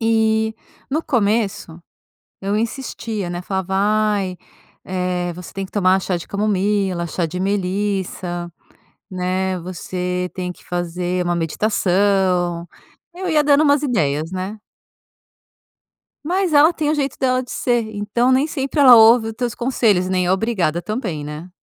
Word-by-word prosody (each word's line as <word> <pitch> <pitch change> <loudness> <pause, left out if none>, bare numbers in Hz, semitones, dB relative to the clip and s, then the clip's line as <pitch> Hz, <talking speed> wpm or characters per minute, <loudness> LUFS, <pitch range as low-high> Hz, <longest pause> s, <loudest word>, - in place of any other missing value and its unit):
E 220 -1 +2 0.4
no 310 +4 0
começo 210 - 0 0.6
eu 200 +1 -1
insistia, 225 -4 -3
né? 175 0 -4
Falava: 190 0 -3
“Ai, 205 -2 +1 0.5
eh, 180 -1 -2
você 180 0 -10
tem 195 0 -4
que - - -16
tomar 190 -2 +3
chá 180 -1 -1
de 170 - -9
camomila, 200 -3 0
chá 170 +1 -1
de 170 +3 -5
melissa, 190 -2 -2 0.6
né. 185 0 -1
Você 180 0 -3
tem 180 -1 -3
que - - -16
fazer 175 +1 -2
uma 175 0 0
meditação”. 180 -1 +1 0.5
Eu 370 0 -3
ia 305 -2 +3
dando 290 +1 +4
umas 285 -1 +3
ideias, 160 - 0
né. 190 +3 -4 1.7
Mas 365 +2 0
ela 300 +3 +6
tem 310 -3 -2
o 305 - +2
jeito 280 -3 -2
dela 255 -1 +1
de 245 - -12
ser, 240 -2 +1
então 215 +5 +1
nem 260 +3 +3
sempre 275 -1 -3
ela 260 -3 +9
ouve 225 0 +6
os - - -4
teus 240 +1 -3
conselhos, 225 -7 +1
nem 185 -1 +1
é 180 - +3
obrigada 190 -5 0
também, 190 - -4
né? 150 +5 -8
195 Hz, 145 wpm, -20 LUFS, 180-235 Hz, 1.7 s, ela